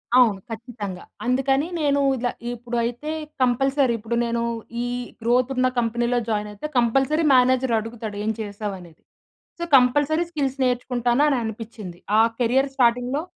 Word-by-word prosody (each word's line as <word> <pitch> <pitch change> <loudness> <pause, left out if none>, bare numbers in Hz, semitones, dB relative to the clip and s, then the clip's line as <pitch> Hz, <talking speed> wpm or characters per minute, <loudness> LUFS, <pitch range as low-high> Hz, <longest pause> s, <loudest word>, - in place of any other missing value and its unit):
అవును. 230 -6 +5
ఖచ్చితంగా. 220 -5 -6 0.2
అందుకని 270 +4 +1
నేను 285 -2 +2 0.2
ఇలా, 245 0 -1 0.2
ఇప్పుడు 240 0 -5
అయితే 245 +6 -3 0.3
కంపల్సరీ, 265 +1 +2
ఇప్పుడు 225 +2 -3
నేను 235 0 -1 0.4
ఈ - - -2 0.4
గ్రోత్ 245 +3 +2
ఉన్న 255 0 +3
కంపెనీ‌లో 240 +1 0
జాయిన్ 210 -1 -1
అయితే 205 +9 -6
కంపల్సరీ 270 +7 +2
మేనేజర్ 255 0 +3
అడుగుతాడు, 220 -1 -6
ఏం 220 - +1
చేసావ్ 205 -1 -4
అనేది? 170 -3 -15 0.6
సో 340 - -3
కంపల్సరీ 290 +6 +3
స్కిల్స్ 275 -4 -2
నేర్చుకుంటాను 245 +1 +1
అని 275 - +2
అనిపిచ్చింది. 220 -5 -7 0.2
ఆ - - +6 0.2
కేరియర్ 260 +4 +2
స్టార్టింగ్‌లో 245 +2 +2
245 Hz, 140 wpm, -23 LUFS, 225-265 Hz, 0.6 s, ఆ